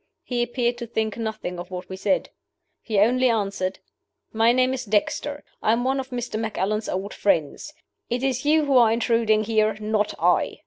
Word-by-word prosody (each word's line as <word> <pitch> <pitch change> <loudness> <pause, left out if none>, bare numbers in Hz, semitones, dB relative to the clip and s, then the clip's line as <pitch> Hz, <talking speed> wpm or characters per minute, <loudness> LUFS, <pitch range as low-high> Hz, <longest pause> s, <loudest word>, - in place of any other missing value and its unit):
He 245 -1 -2
appeared 240 0 -1
to 235 - -5
think 220 -1 -2
nothing 220 -6 -4
of 175 - -7
what 180 -1 -6
we 190 - -6
said. 190 0 0 0.5
He 215 -3 -2
only 250 +5 +4
answered, 200 -4 -1 0.6
'My 225 +1 +4
name 255 +1 +2
is 260 -1 -3
Dexter. 250 +7 -1 0.2
I 215 - +3
am 235 +1 0
one 265 +1 +1
of 265 0 -5
Mr. 240 -3 -4
Macallan's 215 -1 -2
old 195 +3 -3
friends. 165 - 0 0.4
It 245 +2 -2
is 265 -1 0
you 305 +1 +3
who 275 -2 +3
are 235 -3 +6
intruding 230 -2 +2
here 215 -1 +1
not 210 -1 -1
I. - - +2
225 Hz, 185 wpm, -24 LUFS, 210-245 Hz, 0.6 s, are